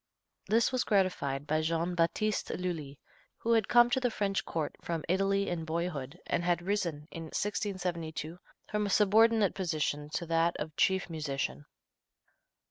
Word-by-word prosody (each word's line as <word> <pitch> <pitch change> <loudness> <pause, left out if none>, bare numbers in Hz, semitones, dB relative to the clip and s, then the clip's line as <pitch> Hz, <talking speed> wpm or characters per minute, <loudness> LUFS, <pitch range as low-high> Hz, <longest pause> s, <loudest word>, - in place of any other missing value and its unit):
This 225 +2 +3
was 255 -2 +1
gratified 180 - +1
by 155 +1 +1
Jean 165 +2 0
Battiste 185 +5 0
Lully, 160 -6 -4 0.4
who 230 - -1
had 225 -3 +3
come 240 0 +6
to 260 - +3
the 250 -1 +1
French 200 -3 -1
court 155 -3 -3
from 165 -2 -3
Italy 195 +2 +2
in 170 -2 -2
boyhood, 160 -4 -3
and - - 0
had 175 0 +1
risen, 175 -6 -2
in 165 -1 -6
1672, 175 -4 -3 0.3
from 210 -1 -1
a - - -3
subordinate 215 +1 +4
position 150 -5 -2
to 170 - -2
that 165 +1 +1
of 155 0 -5
chief 190 0 +2
musician. 145 -3 -3
175 Hz, 150 wpm, -31 LUFS, 160-200 Hz, 0.4 s, come